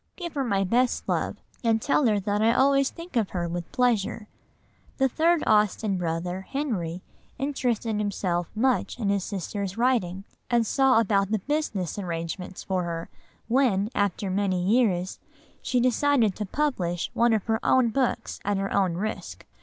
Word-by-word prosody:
Give 345 Hz, -3 st, -6 dB
her 280 Hz, -, -1 dB
my 200 Hz, -6 st, +1 dB
best 240 Hz, +6 st, +1 dB
love -, -, -1 dB, 0.3 s
and 225 Hz, -1 st, +3 dB
tell 280 Hz, +2 st, +2 dB
her 210 Hz, -2 st, +2 dB
that 205 Hz, +1 st, 0 dB
I 230 Hz, +2 st, +4 dB
always 275 Hz, +1 st, +4 dB
think 335 Hz, -2 st, -11 dB
of 220 Hz, -5 st, +1 dB
her 175 Hz, -2 st, -2 dB
with 170 Hz, 0 st, -5 dB
pleasure." 225 Hz, -4 st, 0 dB, 0.7 s
The 265 Hz, -, +3 dB
third 325 Hz, +5 st, +2 dB
Austen 210 Hz, -1 st, +2 dB
brother, 175 Hz, +2 st, -2 dB
Henry, 190 Hz, -, -3 dB, 0.3 s
interested 245 Hz, -6 st, -1 dB
himself 185 Hz, -4 st, -1 dB
much 250 Hz, +3 st, +1 dB
in 215 Hz, -5 st, -1 dB
his 200 Hz, -2 st, +1 dB
sister's 200 Hz, 0 st, -4 dB
writing, 225 Hz, -7 st, +1 dB, 0.3 s
and 235 Hz, -2 st, +3 dB
saw 265 Hz, +1 st, +4 dB
about 200 Hz, -3 st, +2 dB
the 220 Hz, -, +1 dB
business 210 Hz, -, -2 dB
arrangements 175 Hz, +1 st, -5 dB
for 185 Hz, -1 st, -1 dB
her, 170 Hz, -1 st, -4 dB, 0.4 s
when, 230 Hz, -5 st, +2 dB
after 200 Hz, -2 st, -1 dB
many 185 Hz, -2 st, 0 dB
years, 195 Hz, -4 st, +1 dB, 0.4 s
she 250 Hz, -, 0 dB
decided 250 Hz, -3 st, +2 dB
to 210 Hz, -, -3 dB
publish 185 Hz, -, -1 dB
one 235 Hz, 0 st, +3 dB
of 220 Hz, -3 st, +1 dB
her 225 Hz, -1 st, 0 dB
own 255 Hz, -2 st, +4 dB
books 255 Hz, +2 st, -1 dB
at 205 Hz, 0 st, 0 dB
her 195 Hz, 0 st, -2 dB
own 190 Hz, -4 st, +2 dB
risk. 215 Hz, +5 st, -5 dB
210 Hz, 160 wpm, -26 LUFS, 190-250 Hz, 0.7 s, I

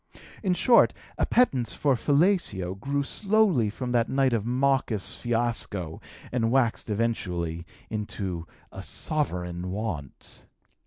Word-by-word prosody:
In 185 Hz, -4 st, +1 dB
short, 235 Hz, +5 st, +5 dB, 0.3 s
appetence 135 Hz, -, +2 dB
for 140 Hz, -2 st, +2 dB
fellatio 140 Hz, -, +1 dB
grew 140 Hz, +8 st, -2 dB
slowly 195 Hz, -, +2 dB
from 125 Hz, +4 st, -4 dB
the 120 Hz, -1 st, +3 dB
night 135 Hz, -2 st, +2 dB
of 110 Hz, -2 st, 0 dB
that -, -, -2 dB
mawkish 130 Hz, -5 st, +1 dB
fiasco 115 Hz, -8 st, -2 dB, 0.3 s
and 115 Hz, -2 st, +1 dB
waxed 120 Hz, -3 st, +1 dB
eventually 90 Hz, -7 st, -2 dB, 0.2 s
into 95 Hz, -5 st, -4 dB, 0.2 s
a -, -, -8 dB
sovereign 90 Hz, -, -2 dB
want. 95 Hz, -, -6 dB
115 Hz, 115 wpm, -27 LUFS, 95-140 Hz, 0.3 s, short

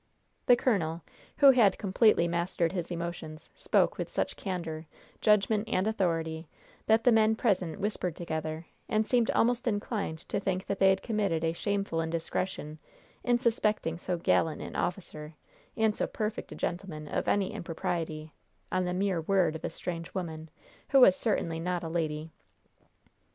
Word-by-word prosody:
The 245 Hz, -, +8 dB
colonel, 170 Hz, -10 st, 0 dB, 0.3 s
who 280 Hz, -2 st, +8 dB
had 220 Hz, -7 st, +4 dB
completely 200 Hz, -3 st, +3 dB
mastered 170 Hz, 0 st, 0 dB
his 175 Hz, -3 st, -3 dB
emotions, 170 Hz, -2 st, -6 dB
spoke -, -, +1 dB
with -, -, -3 dB
such -, -, -1 dB
candor, 170 Hz, -5 st, -5 dB, 0.3 s
judgment 210 Hz, +1 st, +3 dB
and 185 Hz, -1 st, +1 dB
authority 165 Hz, -6 st, -1 dB, 0.4 s
that 220 Hz, +1 st, +4 dB
the 245 Hz, -, +5 dB
men 220 Hz, -1 st, +4 dB
present 190 Hz, -6 st, 0 dB
whispered 195 Hz, -4 st, -2 dB
together, 160 Hz, -1 st, -4 dB, 0.2 s
and 215 Hz, 0 st, +2 dB
seemed 240 Hz, -1 st, +2 dB
almost 240 Hz, +1 st, +2 dB
inclined 205 Hz, -5 st, -2 dB
to -, -, 0 dB
think 190 Hz, -1 st, -2 dB
that 200 Hz, 0 st, -3 dB
they 195 Hz, -, +6 dB
had 190 Hz, 0 st, +2 dB
committed 205 Hz, -8 st, 0 dB
a 165 Hz, 0 st, +1 dB
shameful 200 Hz, -3 st, -1 dB
indiscretion 160 Hz, -1 st, -3 dB, 0.4 s
in 245 Hz, -1 st, +3 dB
suspecting 215 Hz, -8 st, 0 dB
so 180 Hz, 0 st, -2 dB
gallant 165 Hz, -1 st, +1 dB
an -, -, -7 dB
officer 155 Hz, -4 st, -4 dB, 0.4 s
and 220 Hz, -2 st, +2 dB
so -, -, -1 dB
perfect 215 Hz, 0 st, -4 dB
a -, -, -6 dB
gentleman 170 Hz, -4 st, -4 dB
of -, -, -2 dB
any 200 Hz, -2 st, +1 dB
impropriety, 160 Hz, -2 st, -4 dB, 0.4 s
on 185 Hz, 0 st, +1 dB
the 180 Hz, 0 st, -2 dB
mere 190 Hz, -3 st, 0 dB
word 175 Hz, -2 st, +2 dB
of 160 Hz, -, -7 dB
a -, -, -1 dB
strange 165 Hz, -1 st, -6 dB
woman, 160 Hz, -3 st, -5 dB, 0.4 s
who 275 Hz, -, +6 dB
was 190 Hz, -7 st, +8 dB
certainly 170 Hz, -7 st, -1 dB
not 175 Hz, +1 st, -2 dB
a -, -, -3 dB
lady. 160 Hz, -1 st, -2 dB
180 Hz, 160 wpm, -29 LUFS, 165-210 Hz, 0.4 s, The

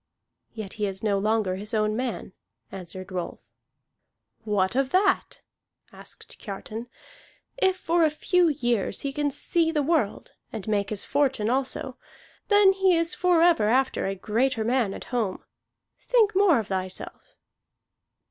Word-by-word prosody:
"Yet 215 Hz, -4 st, -6 dB
he 205 Hz, -, +2 dB
is 190 Hz, +1 st, -6 dB
no 200 Hz, -2 st, +1 dB
longer 210 Hz, -2 st, 0 dB
his 210 Hz, +3 st, -4 dB
own 215 Hz, 0 st, +1 dB
man," 240 Hz, -5 st, -4 dB, 0.4 s
answered 185 Hz, 0 st, -8 dB
Rolf. 180 Hz, -2 st, -4 dB, 1.0 s
"What 205 Hz, -1 st, 0 dB
of 270 Hz, 0 st, +1 dB
that?" 380 Hz, +3 st, +1 dB, 0.5 s
asked -, -, -13 dB
Kiartan. 215 Hz, +3 st, -7 dB, 0.7 s
"If 380 Hz, -6 st, +2 dB
for 340 Hz, -2 st, +1 dB
a 315 Hz, -, +5 dB
few 350 Hz, +4 st, +2 dB
years 240 Hz, -8 st, 0 dB
he 280 Hz, -1 st, -3 dB
can 295 Hz, 0 st, 0 dB
see 325 Hz, +4 st, 0 dB
the 300 Hz, -3 st, 0 dB
world, 295 Hz, -9 st, -1 dB, 0.2 s
and 210 Hz, -2 st, -7 dB
make 200 Hz, -2 st, 0 dB
his 210 Hz, -2 st, -3 dB
fortune 265 Hz, -6 st, +1 dB
also, 260 Hz, 0 st, -2 dB, 0.5 s
then 410 Hz, -2 st, +6 dB
he 380 Hz, -2 st, +3 dB
is 335 Hz, +1 st, 0 dB
forever 340 Hz, -10 st, +3 dB
after 260 Hz, -4 st, +1 dB
a 195 Hz, -, -2 dB
greater 225 Hz, +4 st, 0 dB
man 230 Hz, -4 st, 0 dB
at -, -, -8 dB
home. 220 Hz, -6 st, -1 dB, 0.6 s
Think 450 Hz, -4 st, +2 dB
more 375 Hz, -4 st, +4 dB
of 225 Hz, -, -1 dB
thyself!" 185 Hz, -1 st, -5 dB
245 Hz, 145 wpm, -25 LUFS, 205-330 Hz, 1.0 s, then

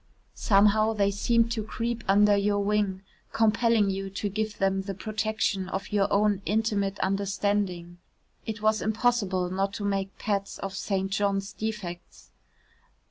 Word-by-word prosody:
Somehow 215 Hz, +1 st, +3 dB
they 200 Hz, -2 st, +1 dB
seemed 230 Hz, +3 st, +2 dB
to 225 Hz, -2 st, -2 dB
creep 230 Hz, +2 st, -3 dB
under 205 Hz, +1 st, +5 dB
your 205 Hz, 0 st, +1 dB
wing, 200 Hz, -2 st, 0 dB, 0.3 s
compelling 225 Hz, -2 st, +3 dB
you 195 Hz, 0 st, -4 dB
to 200 Hz, +1 st, -3 dB
give 215 Hz, +1 st, -3 dB
them 195 Hz, 0 st, +1 dB
the 195 Hz, 0 st, -5 dB
protection 215 Hz, -2 st, -2 dB
of 195 Hz, +1 st, -4 dB
your 205 Hz, -1 st, +1 dB
own 205 Hz, -1 st, +2 dB
intimate 205 Hz, -2 st, 0 dB
understanding. 195 Hz, -3 st, -1 dB, 0.5 s
It 220 Hz, -1 st, -5 dB
was 215 Hz, 0 st, +2 dB
impossible 215 Hz, -5 st, 0 dB
not 195 Hz, +1 st, -1 dB
to 205 Hz, -, -4 dB
make 195 Hz, -1 st, -2 dB
pets 200 Hz, -2 st, -2 dB
of 195 Hz, 0 st, -5 dB
St. 195 Hz, -1 st, -2 dB
John's 200 Hz, 0 st, -1 dB
defects. 205 Hz, -6 st, -6 dB
200 Hz, 140 wpm, -27 LUFS, 195-215 Hz, 0.5 s, under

